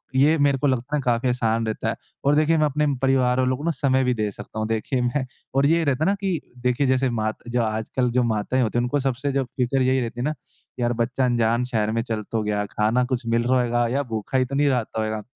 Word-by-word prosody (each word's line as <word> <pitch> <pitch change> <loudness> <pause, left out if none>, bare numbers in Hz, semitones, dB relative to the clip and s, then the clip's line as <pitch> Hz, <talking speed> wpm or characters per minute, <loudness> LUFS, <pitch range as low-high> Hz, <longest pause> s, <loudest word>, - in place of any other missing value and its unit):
ये 150 +4 +4
मेरे 140 -1 +3
को 145 - +1
लगता 130 +3 -1
है 145 - 0
काफ़ी 125 +1 +1
आसान 115 -2 0
रहता 110 - -2
है - - -2 0.3
और 145 +1 +4
देखिए 155 +2 +3
मैं 155 - +3
अपने 150 +1 +1
परिवार 130 -1 +2
वालों 130 0 +1
को 145 - -8
ना 170 - +1
समय 130 -2 +1
भी 125 - +2
दे 110 -3 -1
सकता 110 - -8
हूँ। 110 - -1
देखिए 115 +3 -1
मैं 130 +2 0 0.3
और 135 +1 +4
ये 165 +1 +3
रहता 140 +2 +1
है - - +2
ना 200 - +2
कि 185 -5 -1 0.2
देखिए 125 +2 +1
जैसे 130 0 +2
मात 110 -2 -2
जो 120 0 +1
आजकल 110 +3 -1
जो 125 +1 +2
माताएँ 115 +3 0
होती 115 +1 -1
हैं, 120 - +2
उनको 135 +4 0
सबसे 135 +1 -1
जो 135 -1 +1
फिक्र 130 +1 +1
यही 130 +1 +2
रहती 120 0 -5
है - - -1
ना 155 - 0 0.5
यार, 120 0 +1
बच्चा 120 +3 0
अनजान 120 -1 +2
शहर 110 -3 -1
में 115 +1 0
चल 110 -3 -3
तो 110 -2 0
गया, 105 -1 -1
खाना 110 +5 +1
कुछ 125 -1 -3
मिल 115 0 +2
रहा 130 +1 +2
होएगा 120 -1 +1
या 140 +3 0
भूखा 110 +4 -2
ही 130 - +2
तो 135 - -5
नहीं 145 +1 +3
रहता 120 -4 -1
होगा। 110 0 -3
125 Hz, 260 wpm, -23 LUFS, 115-135 Hz, 0.5 s, ये